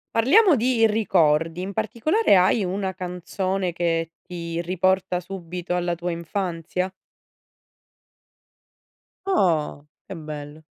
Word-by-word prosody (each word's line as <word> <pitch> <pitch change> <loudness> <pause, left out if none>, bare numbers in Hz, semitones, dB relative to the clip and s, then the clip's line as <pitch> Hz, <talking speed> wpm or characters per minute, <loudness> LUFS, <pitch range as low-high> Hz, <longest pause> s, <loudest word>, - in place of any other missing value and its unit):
Parliamo 330 - +5
di 235 -1 +3
ricordi. 165 -6 +2
In 190 - -4
particolare 235 - +2
hai 190 +3 +4
una 190 +1 -2
canzone 185 +1 -3
che 165 -1 -1
ti 170 -1 -5
riporta 185 +1 +1
subito 180 -1 -5
alla 175 -1 0
tua 175 +1 -4
infanzia? 175 +1 -3 2.3
Oh! 165 - +1 0.2
Che 195 - -7
bello. 150 -1 -8
180 Hz, 100 wpm, -23 LUFS, 170-195 Hz, 2.3 s, Parliamo